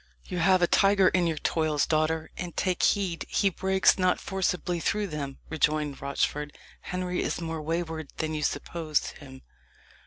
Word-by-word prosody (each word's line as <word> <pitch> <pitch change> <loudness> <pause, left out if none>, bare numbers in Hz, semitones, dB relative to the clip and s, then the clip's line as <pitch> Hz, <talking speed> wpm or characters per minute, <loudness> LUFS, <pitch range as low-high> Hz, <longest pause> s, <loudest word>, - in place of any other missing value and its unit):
"You 180 - -4
have 185 +1 +4
a - - +5
tiger 195 0 +5
in 180 -2 +2
your 160 -2 -1
toils, 155 -1 +1
daughter, 155 0 0
and 175 -2 -6
take 185 -2 0
heed 190 -5 +1
he 200 -2 +2
breaks 190 +1 +3
not 185 0 +2
forcibly 180 -2 -1
through 210 +5 0
them," 145 -6 -5
rejoined 150 -2 0
Rochford. 145 +1 -2 0.2
"Henry 180 0 -3
is - - -2
more 165 -2 -4
wayward 160 -1 -3
than 155 0 -2
you 155 - -2
suppose 155 0 -1
him. 130 -3 -13
165 Hz, 160 wpm, -27 LUFS, 155-185 Hz, 0.2 s, a